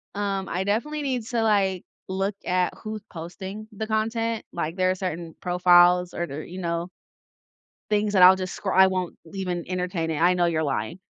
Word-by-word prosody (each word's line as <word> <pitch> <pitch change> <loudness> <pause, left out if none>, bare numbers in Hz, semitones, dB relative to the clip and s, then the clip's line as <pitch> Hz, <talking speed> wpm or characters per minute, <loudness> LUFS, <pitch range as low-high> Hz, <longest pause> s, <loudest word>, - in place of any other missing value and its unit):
um, 200 -2 -2
I 185 +2 -1
definitely 295 +10 -1
need 255 -5 -2
to, 235 -2 0
like, 195 -4 +2 0.2
look 195 +1 -1
at 180 0 +1
who's 215 -1 -5
posting 190 +5 -7
the 215 +1 -5
content, 225 +1 -1
like, 165 -1 -3
there 185 -1 +2
are 185 - -1
certain 170 -3 -5
profiles 180 0 +4
or, 175 - -2
there 150 +1 -6
you 180 +2 -8
know 170 0 -2 1.0
things 210 0 +1
that 190 -3 +6
I'll 185 +1 +9
just 185 -1 -4
scr 190 - -3
I 190 0 +7
won't 185 -2 -2
l 165 - -13
even 180 -3 -3
entertain 180 -3 -2
it, 155 - -2
"I 180 +2 +5
know 175 -1 +2
you're 160 -2 +1
lying," 135 +2 -2
185 Hz, 195 wpm, -25 LUFS, 175-205 Hz, 1.0 s, I'll